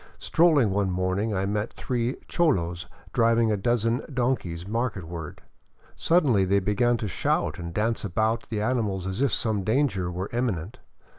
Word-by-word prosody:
Strolling 155 - +3
one 100 0 +1
morning, 95 +4 -1
I 95 +1 0
met 105 +2 -2
three 125 0 -2
cholos 90 - 0 0.3
driving 115 -2 +3
a - - +2
dozen 115 +4 +1
donkeys 120 -10 -1
marketward. 95 -8 -4 0.5
Suddenly 145 - +3
they 95 +1 +2
began 105 +5 +2
to 110 - -3
shout 90 - -1
and 85 -1 -5
dance 110 +5 -1
about 110 +4 -1
the 105 -2 -2
animals 105 -6 -1
as 95 +5 -3
if 140 - +2
some 110 -4 0
danger 110 -6 +1
were 90 +2 -4
Imminent. 110 -7 -2
110 Hz, 150 wpm, -26 LUFS, 95-120 Hz, 0.5 s, Strolling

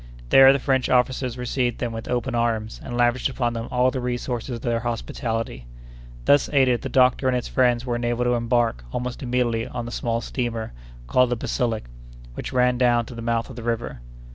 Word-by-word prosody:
There 135 0 +8
the 140 - +2
French 130 -1 0
officers 125 0 +1
received 125 -1 -1
them 120 -2 -3
with 115 0 -6
open 125 +1 -1
arms, 115 -2 -1
and 120 - -5
lavished 120 +2 +2
upon 120 -3 -1
them 115 0 -4
all 125 +1 +2
the 130 - -3
resources 125 0 -3
of 115 - -9
their 120 -1 0
hospitality. 115 - -4 0.6
Thus 145 - +4
aided, 130 -4 +3
the - - -4
doctor 130 0 +3
and 130 - +2
his 125 - -2
friends 125 -1 +2
were 120 -2 -1
enabled 120 0 -1
to 120 - +2
embark 115 - +1
almost 125 0 -4
immediately 120 -3 0
on 120 - -5
the 120 - -6
small 115 -1 -1
steamer 115 - -3 0.3
called 125 - +3
the 120 - +1
Basilic, 115 -1 -1 0.5
which - - -6
ran 125 -1 +2
down 120 -2 +3
to 125 - -10
the 115 - -7
mouth 115 0 -1
of - - -10
the 120 - -7
river. 115 - -3
120 Hz, 200 wpm, -23 LUFS, 115-125 Hz, 0.6 s, There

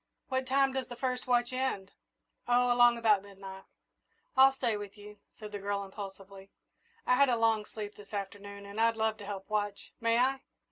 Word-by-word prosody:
"What 260 0 -1
time 270 0 +3
does 265 -2 -2
the 240 - -8
first 250 +1 -2
watch 245 0 +2
end?" 255 -7 -2 0.6
"Oh, 245 0 +4
along 240 -1 +6
about 215 -4 +4
midnight." 195 -1 -11 0.7
"I'll 265 +1 +8
stay 245 -4 -1
with 205 0 -7
you," 210 0 -12 0.2
said 210 -1 -8
the 205 - -5
girl 200 0 -2
impulsively; 195 0 -9 0.6
"I - - +4
had 280 +1 +5
a 245 - +3
long 225 -2 +2
sleep 210 -1 -7
this 205 -1 -14
afternoon, 200 0 -6
and 200 +2 -4
I'd 230 0 +3
love 220 0 +1
to 205 - -10
help 195 -2 -6
watch. 205 -1 -3
May 230 0 +2
I?" 265 +2 +2
215 Hz, 190 wpm, -31 LUFS, 200-245 Hz, 0.7 s, I'll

